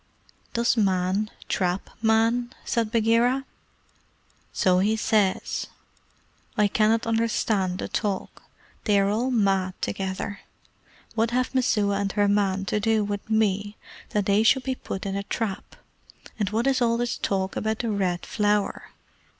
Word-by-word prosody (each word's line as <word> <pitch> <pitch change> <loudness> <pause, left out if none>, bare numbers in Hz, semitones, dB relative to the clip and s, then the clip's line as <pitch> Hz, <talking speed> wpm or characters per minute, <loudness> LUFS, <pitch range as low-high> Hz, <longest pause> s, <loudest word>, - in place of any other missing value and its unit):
"Does 235 0 +2
Man 190 0 +1 0.2
trap 180 0 -1
Man?" 230 +2 +2
said 230 -2 0
Bagheera. 235 +4 +2 1.1
"So 185 -3 +3
he 210 +3 +2
says. 215 -3 0 0.9
I 210 - +4
cannot 220 +2 +2
understand 220 -5 0
the - - -4
talk. 200 -3 -3 0.4
They 205 -2 +4
are 195 0 +2
all 235 +5 0
mad 195 -6 +1
together. 195 +1 -3 0.7
What 225 0 +1
have 255 +2 0
Messua 210 -6 +2
and 200 -1 -1
her 205 -1 +2
man 200 -1 +1
to 205 +3 0
do 220 0 +2
with 205 +1 -4
me 205 -1 +1 0.3
that 205 -2 0
they 200 +2 +3
should 255 +4 +4
be 265 - -1
put 195 -6 -6
in 195 0 -2
a 200 - -1
trap; 200 -1 -4 0.6
and 205 -3 0
what 225 +3 0
is 270 -1 +2
all 230 -1 +3
this 240 0 -1
talk 190 -1 -1
about 220 0 -1
the 230 -1 -2
Red 185 -4 -1
Flower? 210 -1 0
210 Hz, 145 wpm, -25 LUFS, 195-230 Hz, 1.1 s, I